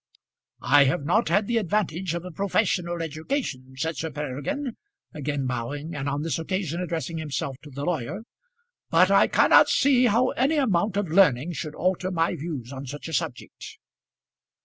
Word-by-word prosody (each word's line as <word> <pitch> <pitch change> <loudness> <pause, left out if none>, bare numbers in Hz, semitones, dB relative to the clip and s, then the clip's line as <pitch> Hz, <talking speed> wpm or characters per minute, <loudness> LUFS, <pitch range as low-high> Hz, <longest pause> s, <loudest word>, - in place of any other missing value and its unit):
"I 145 -1 +6
have 135 +1 0
not 205 +9 +2
had 200 +5 +2
the 235 +2 0
advantage 190 -4 -1
of 170 +1 -5
a 180 - -7
professional 175 -2 0
education," 155 - -4
said 160 +3 -2
Sir 160 - -3
Peregrine, 150 - -4 0.4
again 145 -2 -3
bowing, 130 +6 -4
and 140 -2 -3
on 145 +1 -2
this 165 -2 -1
occasion 175 -1 -2
addressing 165 -2 -3
himself 140 -3 -3
to 150 - -12
the 140 +1 -5
lawyer; 175 - -3 0.7
"but - - +4
I - - +5
cannot - - +5
see 260 -3 +4
how 240 +3 +3
any 275 +6 +1
amount 205 - +1
of 205 -4 -1
learning 165 -4 +4
should 155 -2 -5
alter 185 +1 0
my 165 -2 0
views 140 -5 -6
on 135 0 -7
such 145 +5 -7
a - - -7
subject." 125 -3 -4
165 Hz, 170 wpm, -25 LUFS, 145-195 Hz, 0.7 s, I